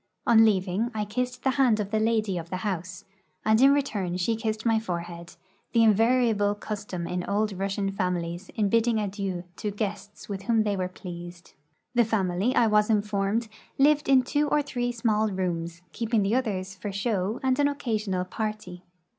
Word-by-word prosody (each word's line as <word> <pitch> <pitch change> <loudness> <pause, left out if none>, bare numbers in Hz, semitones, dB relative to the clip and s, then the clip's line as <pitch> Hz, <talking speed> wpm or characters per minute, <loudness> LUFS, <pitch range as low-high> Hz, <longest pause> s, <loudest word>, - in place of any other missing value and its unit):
On 225 -1 +6
leaving 200 +1 +1
I 210 -1 -1
kissed 250 +4 -3
the 265 - +3
hand 235 -5 +4
of 205 -1 -3
the 220 - +1
lady 220 -3 +1
of 165 0 -9
the 185 - -3
house, 185 -2 -4 0.4
and 220 +2 +4
in 270 +1 +7
return 205 -11 0
she 205 +6 0
kissed 220 -1 -3
rny 225 -2 +2
forehead, 170 -3 -6 0.4
the 230 - +4
invari 230 +3 +4
able 205 -1 +1
custom 205 -4 -5
in 180 +1 -3
old 210 +1 0
Russian 195 +1 -2
families 180 -1 -3
in 210 -2 +1
l)idding 230 -1 +3
adieu 195 -3 -3
to 210 - -2
guests 205 0 -5
with 195 -2 -5
Avhom 225 +1 +2
they 205 -1 0
were 185 -1 -1
pleased. 175 -1 -10 0.4
The 240 -1 +4
family, 205 +1 0
I 240 - +5
was 210 -1 +3
informed, 210 +1 0 0.3
lived 295 +1 +3
in 265 -2 +6
two 290 +3 0
or 295 0 +2
three 245 -3 -2
small 220 -2 +1
rooms, 170 -3 -3
keeping 225 0 0
the 200 +3 0
others 195 -7 -1
for 200 +2 -5
show 200 +1 -1
and 260 +1 +1
an 285 - +4
occasional 215 -9 -2
party. 210 -3 -5
210 Hz, 180 wpm, -26 LUFS, 185-230 Hz, 0.4 s, in